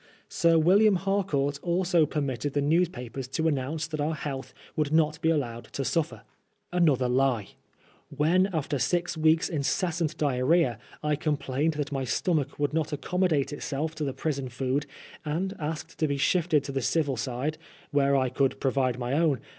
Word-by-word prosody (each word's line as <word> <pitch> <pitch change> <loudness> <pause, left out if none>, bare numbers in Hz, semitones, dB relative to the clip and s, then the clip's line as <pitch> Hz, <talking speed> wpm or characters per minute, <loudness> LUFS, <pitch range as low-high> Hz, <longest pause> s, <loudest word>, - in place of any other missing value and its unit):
Sir 170 -2 +3
William 195 +6 +5
Harcourt 175 -7 0
also 175 -2 +2
permitted 140 -2 -2
the 145 - +1
news* 165 +4 +3
papers 125 -2 -7
to 160 +5 -1
announce 150 +1 -1
that 155 -2 -4
our 155 +2 0
health 140 -2 -5 0.2
would 150 -2 0
not 155 0 +2
be 160 - +2
allowed 120 -7 -1
to 135 - -2
suffer. 165 +2 -1 0.5
Another 150 -8 +3
lie 125 -2 +2
I - - -28 0.5
When, 175 +6 +2
after 150 -4 -1
six 175 +9 0
weeks* 160 +1 +3
incessant 160 +2 -1
diarrhoea, 135 -2 +2 0.2
I 150 0 +1
complained 150 0 -1
that 145 -1 -3
my 135 -1 -1
stomach 150 +3 0
would 145 0 0
not 160 -1 0
accommodate 155 -2 0
itself 150 +2 -3
to 155 - -4
the 140 - -1
prison 140 -2 -3
food, 130 +3 -1 0.4
and 170 +5 -2
asked 160 +1 -5
to 155 - +2
be 140 -1 -1
shifted 155 0 +2
to 140 - -5
the 135 0 -1
civil 145 0 +1
side, 125 +7 -3 0.3
where 140 -1 +3
I 130 -2 +2
could 135 +2 0
pro 135 - +1
vide 130 -3 +1
my 125 +1 -2
own. 150 -4 +2
150 Hz, 175 wpm, -27 LUFS, 135-165 Hz, 0.5 s, William